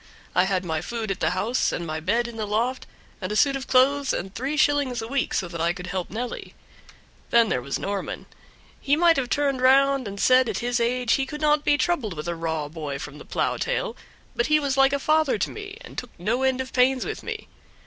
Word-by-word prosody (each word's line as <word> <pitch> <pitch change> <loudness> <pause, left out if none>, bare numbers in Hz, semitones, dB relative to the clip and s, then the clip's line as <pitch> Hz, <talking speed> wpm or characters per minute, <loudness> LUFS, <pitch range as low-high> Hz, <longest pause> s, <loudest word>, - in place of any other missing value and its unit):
I 180 - +4
had 190 -1 -1
my 160 -2 -1
food 225 -3 -4
at 190 - -3
the - - +2
house 205 +8 0
and 170 - -3
my 155 -1 -3
bed 230 +9 0
in 235 - -8
the 215 -2 -3
loft, 235 +5 -1 0.3
and 185 +1 -3
a - - -1
suit 275 +4 +3
of 270 0 -5
clothes, 275 +2 +3
and 190 +2 -4
three 270 +8 -3
shillings 290 -5 +2
a 225 - -4
week, 275 +2 -1
so 185 - 0
that 170 -1 -5
I 170 +1 +2
could 180 0 -8
help 185 -1 -3
Nelly. 240 +4 -5 0.7
Then 230 -2 +4
there 125 - 0
was 140 +2 -3
Norman; 200 0 -4 0.5
he 285 - +2
might 335 +1 +5
have 255 -3 -1
turned 280 -2 0
round 270 -1 +4
and 200 0 -7
said 255 +1 +5
at - - -2
his 245 0 -1
age 240 0 +1
he 270 -1 +1
could 300 -1 -6
not 300 -1 +3
be 290 - +3
troubled 260 - 0
with 150 +2 -6
a 170 - -1
raw 160 -2 -3
boy 150 -2 -5
from 150 +1 -8
the - - -11
plow - - -1
tail, - - -2 0.4
but 240 +1 +1
he 305 0 +4
was 280 -3 -1
like 270 0 +5
a - - +3
father 310 -2 +2
to 200 - -1
me, 410 -1 -8
and - - -7
took 250 - -9
no 220 +8 -1
end 265 -1 +1
of 260 - -7
pains 255 0 +3
with 435 - -5
me. - - -6
245 Hz, 240 wpm, -25 LUFS, 190-275 Hz, 0.7 s, might